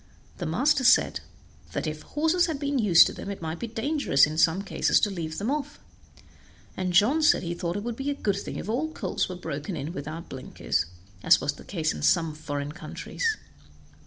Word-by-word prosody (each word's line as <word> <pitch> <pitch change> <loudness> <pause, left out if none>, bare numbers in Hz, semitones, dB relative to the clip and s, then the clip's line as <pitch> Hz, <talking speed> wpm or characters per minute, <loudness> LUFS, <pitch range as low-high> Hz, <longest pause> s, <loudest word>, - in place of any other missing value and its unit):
The 175 - -3
master 260 - +2
said 250 - +4 0.5
that - - -2
'if 155 0 -4
horses 320 +4 +1
had 320 -3 -2
been 280 -1 -1
used 185 -7 +7
to - - -3
them, - - -7
it 200 - -5
might 160 0 -5
be 235 - -4
dangerous 230 - +2
in 155 +1 -5
some 165 +4 +3
cases - - +2
to 210 - +1
leave 160 -4 -5
them 215 +6 -1
off'; 295 0 -3 1.0
and 185 -1 -2
John 215 - +4
said 305 - +4
he 170 0 -2
thought 170 +1 -3
it 205 - -4
would 235 0 -4
be 270 +1 -2
a 285 - -1
good 200 -7 -1
thing - - -6
if - - -5
all 270 +9 -1
colts 190 -2 -2
were 185 - -5
broken 160 0 -5
in 150 +4 -5
without 160 +1 -6
blinkers, 130 -9 -2 0.3
as - - +6
was 145 0 -1
the - - -13
case 160 -5 -1
in - - -7
some 165 -3 +2
foreign 145 -1 -4
countries. 435 - -3
190 Hz, 210 wpm, -26 LUFS, -, 1.0 s, used